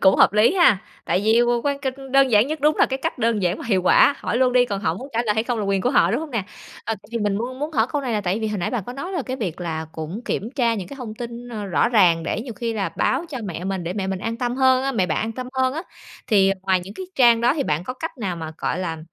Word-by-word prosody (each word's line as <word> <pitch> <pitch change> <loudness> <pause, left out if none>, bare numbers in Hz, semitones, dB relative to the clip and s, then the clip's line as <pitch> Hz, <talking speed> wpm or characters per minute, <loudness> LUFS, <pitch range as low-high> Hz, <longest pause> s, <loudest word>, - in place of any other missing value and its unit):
Cũng 190 0 +5
hợp - - +5
lý 215 - +4
ha! 345 - +5 0.3
Tại 185 - +1
vì 225 +2 +4 0.2
quan 280 -1 0
cạch 265 -2 -3 0.2
đơn 275 -1 +5
giản 215 +3 +5
nhất, 310 0 -4
đúng 300 +2 +3
là - - +4
cái 265 - -3
cách - - -2
đơn 230 -4 +1
giản 180 +1 0
mà - - -7
hiệu 195 -5 +2
quả. 280 +9 +5
Hỏi - - -2
luôn 255 -1 +3
đi, 250 -1 +5
còn 200 -3 -3
họ 165 -5 0
muốn 260 +10 -8
trả 230 - +1
lời 210 - +2
hay 220 - +1
không 240 -2 -2
là 205 - -1
quyền 195 -1 +1
của 250 - +1
họ, - - +4
đúng - - 0
hông 315 -2 -6
nè? 230 -6 -2 0.4
Ờ, 225 - -1 0.2
thì 235 - -2
mình 205 -2 0
muốn 255 +4 -4
muốn 300 +2 -3
hỏi 225 -5 +2
câu 290 - 0
này 245 -3 -2
là 210 - 0
tại 195 +3 -1
vì 220 - -1
hồi 210 -2 -3
nãy 175 - -2
bạn 230 -7 -2
có 245 - -5
nói 350 +9 -6
là 350 - -1
cái 260 +1 -4
việc 185 - -4
là 160 -2 -3
cũng 160 +7 -6
kiểm 210 - -2
tra 235 -4 +2
những 195 -4 -5
cái 280 - -9
thông 230 -5 -7
tin, 235 +1 -7
ơ, 215 -4 -5
rõ 190 - +2
ràng 180 -8 +4
để 205 - -2
nhiều 240 -1 -6
khi 235 -1 -3
là 200 -5 -1
báo 345 - +1
cho 280 -5 -5
mẹ 180 -2 -5
mình, 190 -2 -3
để 175 - -3
mẹ 195 -1 -3
mình 190 -1 -2
an 225 +4 -3
tâm 245 +1 -2
hơn 260 -1 +4
á 270 0 -1
mẹ 190 -6 +1
bạn 155 - -1
an 225 +1 -2
tâm 250 +2 -6
hơn 260 0 +1
á. 325 - -3 0.4
Thì 195 -3 +4
ngoài 190 -1 +2
những 190 +3 -10
cái 375 - -7
trang 235 -3 +5
đó 245 +4 +3
thì 295 - 0
bạn 155 - -1
có 255 - -5
cách 325 +1 -6
nào 185 -6 -3
mà, 160 -1 -6
gọi - - -2
là, 165 -3 -3
225 Hz, 320 wpm, -22 LUFS, 195-255 Hz, 0.4 s, Cũng